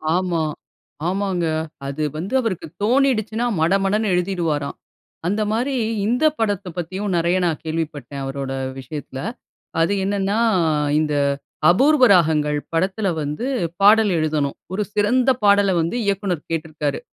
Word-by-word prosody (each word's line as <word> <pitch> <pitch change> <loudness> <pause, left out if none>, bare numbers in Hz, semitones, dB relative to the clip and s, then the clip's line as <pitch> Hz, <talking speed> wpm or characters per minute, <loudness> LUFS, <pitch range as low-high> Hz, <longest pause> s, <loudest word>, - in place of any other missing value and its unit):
ஆமா. 180 -2 0 0.7
ஆமாங்க. 185 -2 -1 0.4
அது 140 +3 -3
வந்து 185 +10 -5
அவருக்கு 190 -8 -3 0.2
தோனிடுச்சுன்னா 235 -2 +2 0.2
மடமடன்னு 195 +4 +2
எழுதிடுவாராம். 170 -5 -1 0.5
அந்த 205 +4 0
மாரி 250 +5 0 0.3
இந்த 245 +7 +2
படத்தப் 200 -5 -1
பத்தியும் 185 +3 -3
நெறைய 170 +2 +2
நான் 160 -3 -1
கேள்விப்பட்டேன் 150 -4 -4
அவரோட 135 0 -4 0.3
விஷயத்துல. 135 0 -7 0.6
அது 170 +5 +2
என்னன்னா, 200 +2 0 0.6
இந்த 150 -1 0 0.6
அபூர்வ 265 - +5
ராகங்கள் 150 -4 +3 0.2
படத்துல 190 +5 0
வந்து, 150 - -3 0.4
பாடல் 210 0 +6
எழுதணும். 155 -3 0 0.2
ஒரு 210 +2 0
சிறந்த 240 +5 +2
பாடல 200 -2 +5
வந்து 165 +8 -2
இயக்குனர் 195 -5 -1
கேட்ருக்காரு. 155 -3 -2
185 Hz, 115 wpm, -21 LUFS, 155-210 Hz, 0.7 s, பாடல்